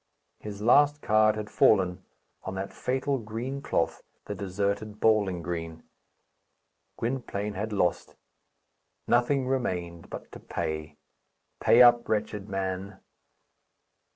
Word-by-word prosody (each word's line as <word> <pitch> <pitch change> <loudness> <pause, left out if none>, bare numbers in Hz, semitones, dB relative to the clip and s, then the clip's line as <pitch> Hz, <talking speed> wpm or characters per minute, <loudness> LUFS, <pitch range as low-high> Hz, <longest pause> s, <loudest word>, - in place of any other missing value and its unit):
His 105 -1 -7
last 145 +5 +4
card 110 0 +4
had 105 -1 -6
fallen 95 -3 +3 0.4
on 95 - -6
that 95 +1 -5
fatal 135 +1 -1
green 120 +5 -5
cloth, 85 - -1 0.2
the - - -4
deserted 100 +2 -3
bowling 100 -6 +2
green. 80 -1 -5 1.1
Gwynplaine 115 -4 -3
had 105 +3 -4
lost. 100 -4 0 0.9
Nothing 130 +2 +2
remained 90 -10 -2
but - - -8
to - - -10
pay. 75 -1 -4 0.6
Pay 120 +2 +7
up, 120 -1 +5
wretched 105 -1 -2
man! 95 0 -3
105 Hz, 110 wpm, -28 LUFS, 95-120 Hz, 1.1 s, Pay